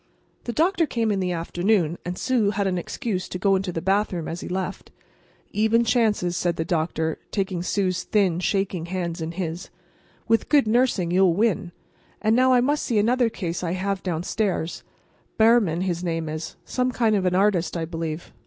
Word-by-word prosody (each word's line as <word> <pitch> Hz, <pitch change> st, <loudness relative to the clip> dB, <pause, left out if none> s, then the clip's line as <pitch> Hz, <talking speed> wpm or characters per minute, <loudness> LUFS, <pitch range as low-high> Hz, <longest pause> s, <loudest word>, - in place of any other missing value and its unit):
The 240 Hz, -, -2 dB
doctor 330 Hz, +4 st, +2 dB
came 225 Hz, -4 st, 0 dB
in 200 Hz, -, 0 dB
the 180 Hz, -1 st, -1 dB
afternoon, 175 Hz, 0 st, 0 dB
and 180 Hz, +1 st, -4 dB
Sue 245 Hz, -6 st, +1 dB
had 200 Hz, 0 st, -1 dB
an 185 Hz, -2 st, 0 dB
excuse 190 Hz, 0 st, -4 dB
to -, -, -4 dB
go 195 Hz, +1 st, +3 dB
into 190 Hz, -1 st, -1 dB
the 165 Hz, -1 st, -4 dB
hallway 195 Hz, -4 st, 0 dB
as 170 Hz, -, -5 dB
he -, -, -6 dB
left. 190 Hz, +1 st, -4 dB, 0.6 s
"Even 220 Hz, +2 st, +3 dB
chances," 215 Hz, -6 st, +1 dB
said 175 Hz, 0 st, 0 dB
the 160 Hz, -, -2 dB
doctor, 160 Hz, -1 st, -1 dB
taking 190 Hz, -3 st, -2 dB
Sue's 185 Hz, 0 st, 0 dB
thin, 190 Hz, -5 st, +1 dB
shaking 185 Hz, -3 st, -1 dB
hand 175 Hz, -2 st, -3 dB
in 160 Hz, +1 st, -4 dB
his. 170 Hz, 0 st, -4 dB, 0.6 s
"With 225 Hz, 0 st, +2 dB
good 290 Hz, -4 st, +5 dB
nursing 220 Hz, -6 st, +2 dB
you'll 180 Hz, -1 st, +4 dB
win. 205 Hz, -4 st, +1 dB, 0.5 s
And 220 Hz, +1 st, +2 dB
now 255 Hz, +1 st, +4 dB
I 250 Hz, -1 st, +5 dB
must 290 Hz, +4 st, +1 dB
see 235 Hz, -, 0 dB
another 235 Hz, +3 st, +3 dB
case 175 Hz, -5 st, -4 dB
I 170 Hz, 0 st, -1 dB
have 190 Hz, +1 st, -2 dB
downstairs. 180 Hz, 0 st, -2 dB, 0.5 s
Behrman, 220 Hz, -7 st, +4 dB
his 180 Hz, -2 st, -2 dB
name 165 Hz, -2 st, -2 dB
is—some 210 Hz, +10 st, -3 dB
kind 225 Hz, -3 st, +2 dB
of 190 Hz, -2 st, 0 dB
an 180 Hz, -, +1 dB
artist, 185 Hz, -3 st, +2 dB
I 165 Hz, -, -2 dB
believe. 165 Hz, 0 st, -5 dB
190 Hz, 180 wpm, -24 LUFS, 175-220 Hz, 0.6 s, good